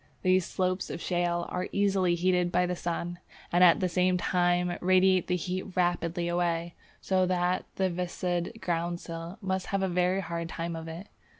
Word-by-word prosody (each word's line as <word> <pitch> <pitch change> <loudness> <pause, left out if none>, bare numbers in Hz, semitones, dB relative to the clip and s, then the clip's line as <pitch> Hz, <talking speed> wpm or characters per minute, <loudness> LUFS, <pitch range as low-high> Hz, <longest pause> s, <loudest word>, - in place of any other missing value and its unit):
These 185 -1 +3
slopes 185 0 -1
of - - -5
shale 175 -1 0
are 180 0 -2
easily 195 -3 +2
heated 180 0 +1
by 180 +1 +3
the 180 0 -2
sun, 175 0 -3 0.3
and 175 +1 +5
at 175 +1 +6
the 185 - +2
same 180 +1 +2
time 175 0 +1
radiate 185 0 +4
the 180 - +1
heat 185 +2 -4
rapidly 175 -1 0
away, 170 -1 0 0.3
so 185 -1 +2
that 180 0 0
the 190 - +1
Viscid 180 +2 -2
Groundsel 170 0 -3
must 190 -1 -2
have 195 -1 0
a - - +2
very 180 +1 +1
hard 170 -1 -4
time 170 -1 -4
of 165 0 -6
it. 165 +4 -7
180 Hz, 175 wpm, -29 LUFS, 175-185 Hz, 0.3 s, at